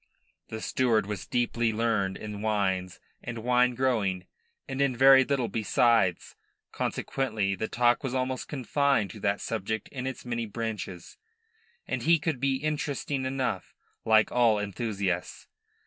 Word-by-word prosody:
The 110 Hz, 0 st, -6 dB
steward 115 Hz, -5 st, +1 dB
was 100 Hz, -2 st, -5 dB
deeply 120 Hz, -1 st, 0 dB
learned 110 Hz, -4 st, 0 dB
in 105 Hz, -1 st, -7 dB
wines 95 Hz, -4 st, -1 dB, 0.2 s
and 115 Hz, -2 st, -6 dB
wine 125 Hz, 0 st, +3 dB
growing 105 Hz, -8 st, 0 dB, 0.4 s
and 135 Hz, 0 st, -3 dB
in 135 Hz, -3 st, +1 dB
very 135 Hz, +1 st, +8 dB
little 130 Hz, -3 st, 0 dB
besides; 115 Hz, -4 st, +1 dB, 0.4 s
consequently 110 Hz, -7 st, -1 dB
the 105 Hz, +3 st, -3 dB
talk 120 Hz, +2 st, +2 dB
was 130 Hz, -1 st, -2 dB
almost 130 Hz, 0 st, -2 dB
confined 135 Hz, -6 st, +1 dB
to 105 Hz, -, -10 dB
that 100 Hz, 0 st, 0 dB
subject 110 Hz, -1 st, -3 dB
in 130 Hz, -1 st, -5 dB
its 130 Hz, -1 st, -6 dB
many 120 Hz, -2 st, -2 dB
branches, 105 Hz, -5 st, -5 dB, 0.7 s
and -, -, -2 dB
he 165 Hz, +1 st, +4 dB
could 150 Hz, -3 st, -2 dB
be 135 Hz, +1 st, +1 dB
interesting 145 Hz, -1 st, -2 dB
enough, 130 Hz, -7 st, -2 dB, 0.3 s
like 110 Hz, -1 st, +4 dB
all 120 Hz, -3 st, +4 dB
enthusiasts. 100 Hz, -3 st, -3 dB
115 Hz, 140 wpm, -28 LUFS, 105-130 Hz, 0.7 s, very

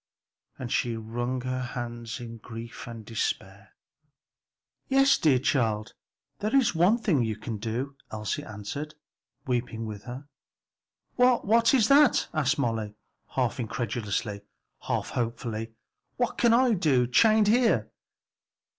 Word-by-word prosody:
and 120 Hz, -3 st, -6 dB
she 120 Hz, -2 st, 0 dB
wrung 120 Hz, +3 st, -3 dB
her 130 Hz, 0 st, -2 dB
hands 120 Hz, -2 st, -5 dB
in 115 Hz, -1 st, -8 dB
grief 115 Hz, +1 st, -9 dB
and 115 Hz, -2 st, -8 dB
despair. 100 Hz, -3 st, -4 dB, 1.1 s
"Yes, 275 Hz, 0 st, +5 dB
dear 145 Hz, -5 st, +4 dB
child; 115 Hz, -5 st, 0 dB, 0.5 s
there 215 Hz, +5 st, -1 dB
is 265 Hz, -4 st, +4 dB
one 180 Hz, +7 st, +4 dB
thing 185 Hz, -, +1 dB
you 110 Hz, -1 st, -1 dB
can 110 Hz, +1 st, -5 dB
do," 120 Hz, +6 st, -4 dB, 0.2 s
Elsie 105 Hz, -1 st, -3 dB
answered, 110 Hz, +9 st, -6 dB, 0.5 s
weeping 120 Hz, -3 st, -2 dB
with 105 Hz, -2 st, -7 dB
her. 130 Hz, +3 st, -8 dB, 0.9 s
"What, 250 Hz, -1 st, +4 dB
what 230 Hz, +4 st, +4 dB
is 225 Hz, -5 st, +4 dB
that?" 285 Hz, 0 st, +5 dB
asked 155 Hz, -1 st, +1 dB
Molly, 115 Hz, -6 st, -2 dB, 0.4 s
half 130 Hz, -1 st, 0 dB
incredulously, 110 Hz, -2 st, -3 dB, 0.5 s
half -, -, -1 dB
hopefully, 115 Hz, -1 st, -3 dB, 0.4 s
"what 245 Hz, -1 st, 0 dB
can 235 Hz, -, +3 dB
I 245 Hz, 0 st, +4 dB
do 145 Hz, -, +3 dB
chained 215 Hz, -, +4 dB
here?" 235 Hz, +2 st, +3 dB
125 Hz, 130 wpm, -27 LUFS, 115-175 Hz, 1.1 s, Yes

